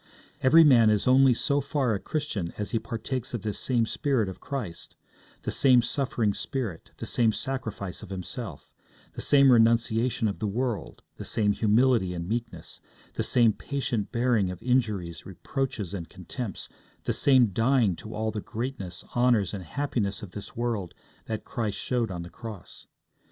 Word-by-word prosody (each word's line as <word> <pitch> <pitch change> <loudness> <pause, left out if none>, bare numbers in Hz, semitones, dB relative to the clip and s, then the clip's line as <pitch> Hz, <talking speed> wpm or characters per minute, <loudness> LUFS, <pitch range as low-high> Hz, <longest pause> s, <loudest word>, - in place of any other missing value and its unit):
Every 160 +6 +7
man 120 -7 +6
is 105 +1 +1
only 130 -1 +6
so 140 +3 +1
far 140 -4 0
a 100 - -1
Christian 110 - -3
as 105 -1 -3
he 115 - +1
partakes 125 +3 -4
of 110 - -5
this 105 -2 -2
same 120 -3 +1
spirit 125 -2 0
of 95 - -9
Christ 120 -12 -6 0.5
the - - -2
same 125 -3 +5
suffering 120 -4 0
spirit, 115 -11 -4
the - - -6
same 115 -2 +2
sacrifice 110 -7 -4
of 105 - -10
himself, 95 - -6 0.4
the - - -6
same 140 -2 +6
renunciation 115 0 +3
of 100 - -3
the 110 - -1
world, 120 +1 -3
the - - -6
same 105 -2 +1
humility 110 -2 +3
and 85 0 -4
meekness, 115 -6 -4 0.3
the - - -2
same 115 -3 +4
patient 130 -6 -3
bearing 115 -5 +2
of 90 -1 -7
injuries, 105 -10 0
reproaches, 105 0 -3
and 85 -5 -5
contempts, 100 +3 -6 0.4
the - - 0
same 130 -5 +4
dying 115 -3 +3
to 110 - -8
all 110 0 -1
the 105 - -4
greatness, 110 -8 -5
honours, 120 -6 +3
and 100 -3 -5
happiness 110 - -2
of 95 - -8
this 105 +1 -9
world 110 -6 -2 0.3
that 110 -2 -4
Christ 110 -6 -3
showed 120 -3 0
on 90 -2 -5
the 85 - -10
cross. 110 -5 -10
115 Hz, 165 wpm, -27 LUFS, 100-130 Hz, 0.5 s, Every